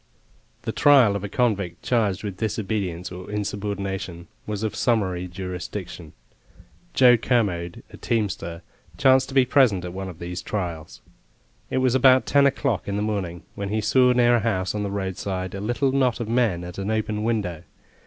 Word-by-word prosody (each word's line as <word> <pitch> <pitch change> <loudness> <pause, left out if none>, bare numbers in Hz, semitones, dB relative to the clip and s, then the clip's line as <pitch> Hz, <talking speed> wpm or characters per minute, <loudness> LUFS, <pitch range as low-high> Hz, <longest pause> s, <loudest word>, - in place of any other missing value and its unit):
The - - -2
trial 130 -8 +5
of 100 - -3
a 100 - -4
convict 100 -8 -1
charged 105 -6 0
with 100 -3 -5
disobedience 95 -5 -3
or 90 0 -8
insubordination 100 -3 -4 0.2
was 105 0 -3
of 110 - -2
summary 95 -6 0
jurisdiction. 90 -2 -7 0.8
Joe 125 -2 +7
Kermode, 95 -8 -1
a - - -11
teamster, 95 -7 -2 0.3
chanced 130 -1 +4
to 135 - -8
be 130 -2 +5
present 120 -9 +3
at 90 - -6
one 95 0 -5
of 90 - -10
these 90 +1 -5
trials. 85 -6 -5 0.7
It - - -1
was 125 - +3
about 130 0 +5
ten 140 -1 +4
o'clock 135 -6 -1
in 100 - -2
the 105 - -1
morning 95 -5 -3
when 100 0 -4
he 110 +2 0
saw 125 +4 +4
near 120 -1 +4
a - - +1
house 95 -5 -1
on 105 - -2
the 100 - -2
roadside 95 -1 -3
a 100 - -5
little 120 +5 0
knot 130 -3 +1
of 120 - -3
men 115 -7 +1
at 90 +2 -8
an 100 +1 -3
open 110 -1 -1
window. 100 -8 -1
100 Hz, 175 wpm, -24 LUFS, 90-120 Hz, 0.8 s, Joe